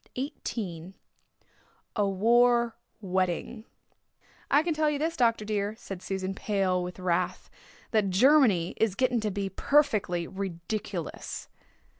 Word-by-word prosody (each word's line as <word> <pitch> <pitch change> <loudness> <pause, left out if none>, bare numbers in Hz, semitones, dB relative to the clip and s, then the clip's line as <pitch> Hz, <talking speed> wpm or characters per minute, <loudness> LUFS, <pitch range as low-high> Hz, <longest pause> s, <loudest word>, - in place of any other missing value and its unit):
CHAPTER 275 +4 -2 0.2
XVIII 180 -5 -5 1.0
A 205 -2 +2
WAR 235 +3 +3 0.3
WEDDING 190 +4 -2 0.8
"I 290 +2 +4
can 335 -1 0
tell 305 0 +2
you 295 - -1
this 325 +3 -1
Dr. 230 -6 +2
dear," 210 0 -1
said 195 -4 -8
Susan, 190 0 -3
pale 195 -3 0
with 180 0 -6
wrath, 180 -2 -1 0.4
"that 215 -3 +2
Germany 210 - +4
is 220 -4 +1
getting 250 +1 +2
to 215 -1 -1
be 200 0 -2
perfectly 205 - +1
ridiculous." 190 -1 -5
205 Hz, 125 wpm, -28 LUFS, 185-240 Hz, 1.0 s, I